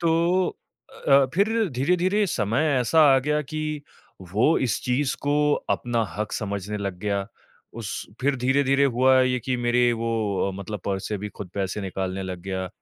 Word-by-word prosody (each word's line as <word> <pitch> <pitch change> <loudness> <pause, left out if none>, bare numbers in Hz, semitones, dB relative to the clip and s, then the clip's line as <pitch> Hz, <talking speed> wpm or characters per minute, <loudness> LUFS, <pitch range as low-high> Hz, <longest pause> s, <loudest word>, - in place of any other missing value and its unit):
तो 170 +2 +2 0.6
अ - - +2
अ, 135 -1 +7
फिर 200 +4 +3 0.2
धीरे-धीरे 180 +10 +1
समय 115 - 0 0.2
ऐसा 160 +7 +3
आ - - +5
गया 150 +3 0
कि 155 0 -4 0.5
वो 120 +11 +3
इस 120 - 0
चीज़ 130 +2 0
को 150 +1 +2 0.2
अपना 120 -1 0
हक़ 105 0 -3
समझने 100 0 -3
लग 100 -3 -4
गया। 100 0 -2 0.5
उस 105 -3 -5 0.3
फिर 140 +1 +1
धीरे-धीरे 135 +2 +2
हुआ 130 0 +4
ये 130 0 +2
कि 125 +2 -2
मेरे 120 0 +2
वो 115 0 -2 0.4
अ, - - -2
मतलब 100 +1 -6
पर्स 95 -1 -2
से 105 - -2
भी 105 +2 -5
खुद 100 -2 -9
पैसे 100 +1 -2
निकालने 95 0 -3
लग 95 -1 -5
गया। 95 -1 -3
125 Hz, 175 wpm, -24 LUFS, 100-145 Hz, 0.6 s, अ